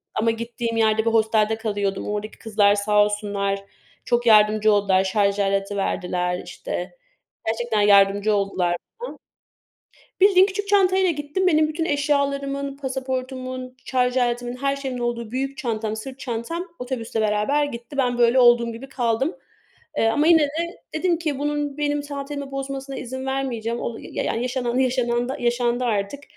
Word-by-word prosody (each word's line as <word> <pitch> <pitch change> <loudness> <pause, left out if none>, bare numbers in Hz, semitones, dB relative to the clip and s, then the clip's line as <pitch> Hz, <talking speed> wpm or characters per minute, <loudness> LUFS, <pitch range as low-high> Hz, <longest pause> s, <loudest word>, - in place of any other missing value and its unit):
ama 225 +1 +2
gittiğim 230 0 -4
yerde 220 0 +2
bir - - +4
hostelde 220 -1 +2
kalıyordum. 205 -3 -2
Oradaki 210 +1 -4
kızlar 205 -2 +3
sağ 210 0 +3
olsunlar 200 -1 -2 0.4
çok 240 0 +1
yardımcı 215 -1 +5
oldular. 195 -2 +3
Şarj 200 +1 +1
aleti 195 0 0
verdiler 180 -2 -1
işte - - -5 0.6
gerçekten 225 -1 0
yardımcı 200 +1 +5
oldular 195 -3 0
bana. 175 - 0 1.5
Bildiğin 380 -1 +7
küçük 405 +1 -4
çantayla 380 -2 +4
gittim. 295 +5 -1
Benim 310 -3 +4
bütün 315 +1 -2
eşyalarımın, 280 -1 -1
pasaportumun, 255 -1 -4
şarj 250 0 +1
aletimin, 245 0 0
her 275 +2 0
şeyimin 265 -3 -4
olduğu 235 -2 -3
büyük 270 +2 -3
çantam, 220 -6 -2
sırt 260 +4 -8
çantam 260 +9 -4
otobüsle 245 -3 -3
beraber 215 +8 +1
gitti. 240 0 -8
Ben 250 -3 +1
böyle 240 +2 +4
olduğum 240 -1 +5
gibi 260 +4 -9
kaldım, 255 +4 0 0.6
eee, - - +3
ama 295 +7 +2
yine 330 -2 +7
de 320 +4 -2 0.2
dedim 340 +2 +1
ki 305 -5 -2
bunun 295 -1 -2
benim 290 0 0
tatilimi 285 -1 -6
bozmasına 275 0 -5
izin 260 +1 -5
vermeyeceğim. 240 -4 -2
O 230 - -4
ya - - -5
yani 230 - -1
yaşanan 250 -1 -1
yaşanan 245 -1 +1
da 265 - -3
yaşandı 240 0 +1
artık. 215 +5 -2
245 Hz, 150 wpm, -23 LUFS, 215-275 Hz, 1.5 s, Bildiğin